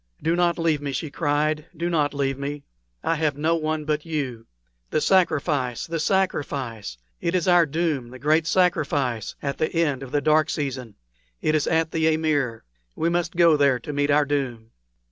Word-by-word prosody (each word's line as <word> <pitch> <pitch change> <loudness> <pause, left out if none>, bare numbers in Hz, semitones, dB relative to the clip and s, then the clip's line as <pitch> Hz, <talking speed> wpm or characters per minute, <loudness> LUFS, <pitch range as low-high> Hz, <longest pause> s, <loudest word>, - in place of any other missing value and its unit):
"Do 165 +1 +1
not 175 -1 +2
leave 165 -3 +1
me!" 140 -1 -3
she 145 +3 -3
cried 150 +1 0
"do 170 +2 -1
not 155 -4 +1
leave 140 -1 -1
me! 140 +1 -4 0.4
I - - +1
have 150 -3 0
no 155 +3 +1
one 155 -1 -2
but 150 0 -1
you. 135 -8 -4 0.4
The - - +1
sacrifice, 150 -8 +1
the 165 0 -3
sacrifice! 140 - -1 0.2
It 170 +1 0
is 180 -1 0
our 175 -2 +5
doom 150 -5 -1
the 130 - -10
great 155 +4 +2
sacrifice 145 - +1
at 140 -1 -3
the 155 - +1
end 150 -6 +1
of 135 -2 -8
the 145 - +2
dark 155 +1 +3
season. 130 -7 -4 0.4
It 155 - 0
is 155 -1 +1
at 160 0 +1
the 160 0 +2
amir. 145 -7 -1 0.3
We 165 - 0
must 170 0 -1
go 170 -2 +5
there 140 -3 +3
to 150 - -6
meet 145 0 0
our 145 0 +4
doom." 125 -6 -3
150 Hz, 185 wpm, -24 LUFS, 140-165 Hz, 0.4 s, our